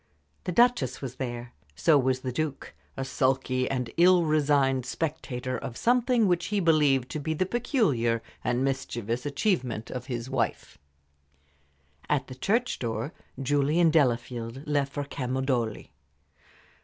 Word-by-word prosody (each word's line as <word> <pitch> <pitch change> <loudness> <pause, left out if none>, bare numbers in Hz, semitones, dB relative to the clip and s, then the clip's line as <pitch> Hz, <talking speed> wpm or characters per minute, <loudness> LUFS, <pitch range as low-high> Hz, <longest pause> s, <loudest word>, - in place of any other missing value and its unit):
The - - -1
Duchess 180 - +3
was 130 -2 -6
there. 120 -2 -5 0.2
So 160 - +4
was 130 -2 +2
the 130 - -3
Duke 145 +2 -3 0.2
a 135 - -2
sulky 130 -1 0
and 125 -3 -2
ill 175 +1 +6
resigned 140 -4 +2
spectator 130 -3 -3
of 125 -2 -6
something 245 -2 +3
which 175 -2 +1
he 205 -1 0
believed 150 -7 +3
to 155 - -3
be 160 +2 -2
the 185 - +1
peculiar 170 - +1 0.2
and 125 +2 0
mischievous 125 -2 -2
achievement 130 - -1
of 125 0 -6
his 120 -2 -4
wife. 135 - -2 1.3
At 140 -3 +1
the - - -6
church 225 - 0
door 115 +4 -3 0.3
Julie 145 +4 +1
and 165 -2 +4
Delafield 120 -2 0
left 145 -2 0
for 145 - -3
Camaldoli. 130 -4 -2
135 Hz, 140 wpm, -27 LUFS, 125-155 Hz, 1.3 s, ill